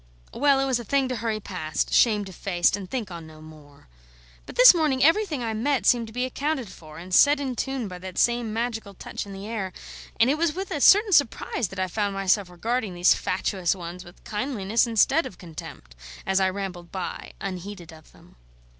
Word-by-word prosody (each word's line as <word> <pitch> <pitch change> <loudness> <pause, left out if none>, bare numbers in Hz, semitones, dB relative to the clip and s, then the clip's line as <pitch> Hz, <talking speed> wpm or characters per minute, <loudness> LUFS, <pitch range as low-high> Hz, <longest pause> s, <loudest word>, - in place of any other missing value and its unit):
Well, 280 +1 +3
it 270 - +1
was 260 -3 0
a - - -6
thing 270 +4 +1
to 255 - -2
hurry 225 -1 -2
past, 180 -6 -3
shamed 210 -4 +3
of 190 - -10
face, 175 -1 +1
and 195 -3 -8
think 230 -8 -4
on 170 -2 -8
no 155 0 -14
more. 150 - -16 0.6
But - - -10
this 250 +6 +9
morning 300 -6 +1
everything 325 - +2
I 225 -1 -2
met 260 +5 0
seemed 235 -2 +3
to - - -11
be 250 +3 -1
accounted 270 -2 -3
for 155 -4 -13
and 180 +2 -9
set 285 +8 +6
in 265 -3 -3
tune 265 -3 -3
by 180 -1 -8
that 185 0 -9
same 240 -2 +1
magical 225 -3 -3
touch 200 - -6
in - - -9
the 195 +1 -8
air; 210 -4 -4 0.5
and 230 - +5
it 290 +4 +1
was 335 -2 +1
with 385 +1 -5
a 295 - -2
certain 410 +4 +6
surprise 255 - +2
that 195 - -11
I 185 - 0
found 200 +1 -2
myself 195 0 +1
regarding 215 +2 -3
these 175 +1 +5
fatuous 185 -1 -1
ones 175 0 -8
with 175 -1 -16
kindliness 220 -1 -1
instead 270 +8 +3
of 180 - -13
contempt, 155 - -10 0.3
as 190 0 +2
I 190 -1 +3
rambled 185 -3 -6
by, 185 -2 -6
unheeded 185 -2 -7
of 155 -1 -17
them. - - -21
210 Hz, 210 wpm, -25 LUFS, 180-255 Hz, 0.6 s, this